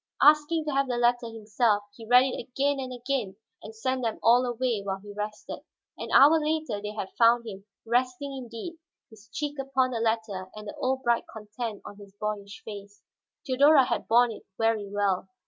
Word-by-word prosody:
Asking 305 Hz, +2 st, +4 dB
to 300 Hz, -, -2 dB
have 275 Hz, 0 st, +1 dB
the 245 Hz, -1 st, -2 dB
letter 240 Hz, 0 st, +2 dB
himself, 220 Hz, -1 st, 0 dB
he 225 Hz, -2 st, -11 dB
read 250 Hz, +2 st, +7 dB
it 260 Hz, -, -3 dB
again 280 Hz, +2 st, 0 dB
and 260 Hz, -1 st, -5 dB
again, 245 Hz, -5 st, -3 dB, 0.3 s
then 215 Hz, -, -9 dB
sent 255 Hz, +4 st, -2 dB
them 225 Hz, -2 st, -1 dB
all 240 Hz, +2 st, +5 dB
away 240 Hz, -3 st, -1 dB
while 195 Hz, -1 st, -3 dB
he 205 Hz, +1 st, -11 dB
rested. 210 Hz, +1 st, -6 dB, 0.4 s
An -, -, -7 dB
hour 300 Hz, +3 st, +6 dB
later 310 Hz, -8 st, -2 dB
they 210 Hz, 0 st, -5 dB
had 200 Hz, -3 st, -6 dB
found 235 Hz, 0 st, +5 dB
him, 195 Hz, -2 st, -8 dB, 0.2 s
resting 255 Hz, +4 st, -1 dB
indeed, 260 Hz, +7 st, -8 dB, 0.3 s
his 220 Hz, 0 st, -17 dB
cheek 290 Hz, +2 st, -4 dB
upon 265 Hz, -1 st, 0 dB
the 235 Hz, -, -2 dB
letter 220 Hz, -4 st, -2 dB
and 215 Hz, 0 st, -9 dB
the -, -, -7 dB
old 265 Hz, +1 st, 0 dB
bright 235 Hz, -1 st, +1 dB
content 215 Hz, 0 st, -6 dB
on 205 Hz, -, -10 dB
his 200 Hz, -1 st, -15 dB
boyish 210 Hz, -1 st, -5 dB
face. 205 Hz, -1 st, -10 dB, 0.4 s
Theodora 280 Hz, +1 st, +5 dB
had -, -, -2 dB
borne 240 Hz, +1 st, +4 dB
it 220 Hz, -, -9 dB, 0.2 s
very 225 Hz, -3 st, 0 dB
well. 200 Hz, -2 st, -1 dB
235 Hz, 190 wpm, -27 LUFS, 210-260 Hz, 0.4 s, read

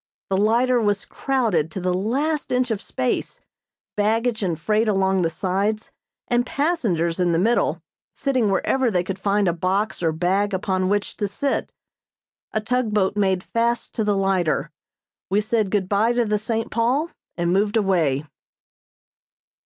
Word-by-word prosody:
The 190 Hz, -, +2 dB
lighter 235 Hz, +4 st, +3 dB
was 205 Hz, -1 st, 0 dB
crowded 225 Hz, -, 0 dB
to 180 Hz, -, -6 dB
the 180 Hz, 0 st, 0 dB
last 275 Hz, -, -1 dB
inch 250 Hz, -1 st, +1 dB
of 215 Hz, -2 st, -1 dB
space; 255 Hz, -2 st, -2 dB, 0.6 s
baggage 225 Hz, +2 st, +1 dB
and 175 Hz, -5 st, -1 dB
freight 215 Hz, +7 st, +1 dB
along 190 Hz, -2 st, +2 dB
the 165 Hz, -, +1 dB
sides, 200 Hz, +5 st, -1 dB, 0.4 s
and 240 Hz, 0 st, +2 dB
passengers 230 Hz, -, 0 dB
in 175 Hz, -1 st, +2 dB
the -, -, +2 dB
middle, 225 Hz, +7 st, +1 dB, 0.3 s
sitting 255 Hz, -6 st, 0 dB
wherever 250 Hz, +6 st, +1 dB
they 180 Hz, -4 st, +1 dB
could 190 Hz, +1 st, -5 dB
find 200 Hz, 0 st, +1 dB
a 170 Hz, -, +2 dB
box 190 Hz, +5 st, -1 dB
or 165 Hz, -2 st, +2 dB
bag 190 Hz, +5 st, 0 dB
upon 185 Hz, -1 st, 0 dB
which 205 Hz, 0 st, -1 dB
to 205 Hz, -, -1 dB
sit. 275 Hz, +8 st, -2 dB, 0.8 s
A 215 Hz, -, 0 dB
tug 230 Hz, -1 st, -1 dB
boat 195 Hz, -1 st, +2 dB
made 190 Hz, -3 st, +1 dB
fast 235 Hz, +1 st, -1 dB
to 220 Hz, -, -1 dB
the 205 Hz, -1 st, +1 dB
lighter 190 Hz, -5 st, 0 dB, 0.6 s
we 195 Hz, +2 st, +2 dB
said 215 Hz, -1 st, 0 dB
good 195 Hz, -2 st, 0 dB
bye 210 Hz, +4 st, +2 dB
to 240 Hz, -1 st, +1 dB
the 210 Hz, -1 st, 0 dB
"St. 225 Hz, +1 st, -2 dB
Paul" 255 Hz, +8 st, +1 dB, 0.3 s
and 170 Hz, 0 st, +1 dB
moved 205 Hz, +3 st, +2 dB
away. 165 Hz, -9 st, +1 dB
205 Hz, 160 wpm, -23 LUFS, 185-230 Hz, 0.8 s, lighter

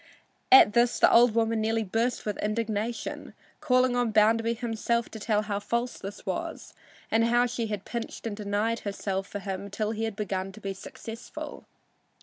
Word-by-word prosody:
At 260 Hz, -5 st, +9 dB
this 240 Hz, 0 st, +3 dB
the -, -, +5 dB
old 235 Hz, -1 st, +6 dB
woman 225 Hz, -1 st, +2 dB
nearly 225 Hz, +1 st, +1 dB
burst 225 Hz, +5 st, -1 dB
with 210 Hz, -2 st, -3 dB
indignation, 215 Hz, +1 st, -3 dB, 0.2 s
calling 255 Hz, -1 st, +3 dB
on 245 Hz, -1 st, +1 dB
Bounderby 225 Hz, +2 st, +3 dB
himself 235 Hz, 0 st, -1 dB
to 220 Hz, -, -8 dB
tell 210 Hz, 0 st, +1 dB
how 205 Hz, -1 st, -2 dB
false 235 Hz, +4 st, -2 dB
this 195 Hz, +1 st, -8 dB
was -, -, -4 dB, 0.4 s
and 225 Hz, +1 st, +4 dB
how 240 Hz, +1 st, +3 dB
she 235 Hz, -2 st, -2 dB
had 210 Hz, -2 st, -4 dB
pinched 235 Hz, -1 st, -5 dB
and 220 Hz, -3 st, -3 dB
denied 210 Hz, +2 st, -1 dB
herself 195 Hz, -1 st, -3 dB
for -, -, -5 dB
him 195 Hz, 0 st, -5 dB
till 210 Hz, +2 st, -2 dB
he 225 Hz, 0 st, -2 dB
had 220 Hz, -2 st, -4 dB
begun 195 Hz, -2 st, -3 dB
to 215 Hz, -, -11 dB
be 195 Hz, -2 st, -4 dB
successful. 225 Hz, +4 st, -9 dB
225 Hz, 175 wpm, -28 LUFS, 205-230 Hz, 0.4 s, At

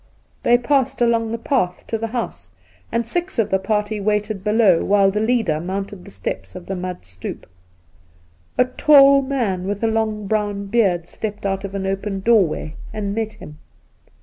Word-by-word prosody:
They 240 Hz, -, +5 dB
passed 270 Hz, +1 st, +1 dB
along 230 Hz, -2 st, +2 dB
the 230 Hz, -, -2 dB
path 230 Hz, -7 st, -1 dB
to -, -, -3 dB
the 225 Hz, -, -2 dB
house, 225 Hz, -, -5 dB, 0.4 s
and 235 Hz, 0 st, 0 dB
six 350 Hz, -, -2 dB
of 225 Hz, -, +1 dB
the 190 Hz, -, +3 dB
party 210 Hz, +1 st, -1 dB
waited 210 Hz, -1 st, -1 dB
below 210 Hz, -5 st, +4 dB
while 195 Hz, -1 st, +4 dB
the 210 Hz, -, -1 dB
leader 220 Hz, -8 st, +1 dB
mounted 190 Hz, +2 st, -5 dB
the -, -, -11 dB
steps 95 Hz, 0 st, -5 dB
of 175 Hz, -, -8 dB
the 195 Hz, -, -4 dB
mud 180 Hz, -, -5 dB
stoep. 90 Hz, 0 st, -7 dB, 1.1 s
A 250 Hz, -, +5 dB
tall 275 Hz, +1 st, +6 dB
man 230 Hz, -10 st, -1 dB
with 205 Hz, +2 st, -3 dB
a -, -, +3 dB
long 220 Hz, -1 st, -1 dB
brown 205 Hz, -1 st, -1 dB
beard 195 Hz, -6 st, +1 dB
stepped 210 Hz, 0 st, -5 dB
out 195 Hz, 0 st, -1 dB
of 200 Hz, 0 st, -6 dB
an 195 Hz, -1 st, -2 dB
open 195 Hz, 0 st, -2 dB
doorway 190 Hz, -8 st, +2 dB, 0.2 s
and 200 Hz, -2 st, -3 dB
met 220 Hz, 0 st, -2 dB
him. 150 Hz, 0 st, -12 dB
210 Hz, 175 wpm, -21 LUFS, 190-230 Hz, 1.1 s, tall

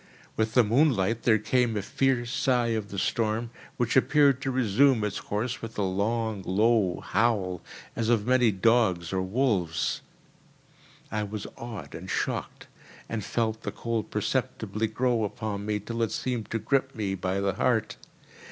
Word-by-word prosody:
With 110 Hz, 0 st, -1 dB
the 125 Hz, -, +7 dB
moonlight 115 Hz, -3 st, +2 dB
there 110 Hz, -3 st, +4 dB
came 115 Hz, +1 st, +1 dB
a 100 Hz, -, -2 dB
fierce 125 Hz, 0 st, 0 dB
sigh 125 Hz, -3 st, +2 dB
of 110 Hz, -2 st, -2 dB
the 100 Hz, -, -6 dB
storm, 115 Hz, +3 st, 0 dB, 0.3 s
which 120 Hz, -1 st, 0 dB
appeared 140 Hz, 0 st, +4 dB
to 135 Hz, -, -2 dB
resume 125 Hz, 0 st, +3 dB
its 105 Hz, -, -2 dB
course 115 Hz, +4 st, -3 dB
with 115 Hz, 0 st, -7 dB
a 105 Hz, -, +1 dB
long, 105 Hz, +2 st, -1 dB
low 100 Hz, -1 st, +2 dB
howl, 100 Hz, -5 st, 0 dB, 0.3 s
as 115 Hz, -1 st, -1 dB
of 115 Hz, -3 st, +2 dB
many 125 Hz, -1 st, +4 dB
dogs 95 Hz, -4 st, +2 dB
or 95 Hz, -, +1 dB
wolves. 95 Hz, -, 0 dB, 1.1 s
I 105 Hz, -, -1 dB
was 105 Hz, 0 st, -5 dB
awed 105 Hz, -12 st, -8 dB
and -, -, -8 dB
shocked, -, -, -3 dB, 0.4 s
and 110 Hz, -2 st, -3 dB
felt 110 Hz, +1 st, -1 dB
the -, -, -4 dB
cold 115 Hz, -2 st, -3 dB
perceptibly 110 Hz, +1 st, -1 dB
grow 120 Hz, +1 st, 0 dB
upon 105 Hz, -1 st, -4 dB
me 105 Hz, -1 st, 0 dB
till 115 Hz, +3 st, -4 dB
it 115 Hz, -, +1 dB
seemed 120 Hz, -4 st, -3 dB
to 115 Hz, -, -1 dB
grip 135 Hz, +5 st, 0 dB
me 100 Hz, -3 st, -2 dB
by 95 Hz, 0 st, -2 dB
the 100 Hz, -1 st, 0 dB
heart. 110 Hz, +2 st, 0 dB
110 Hz, 160 wpm, -27 LUFS, 100-120 Hz, 1.1 s, the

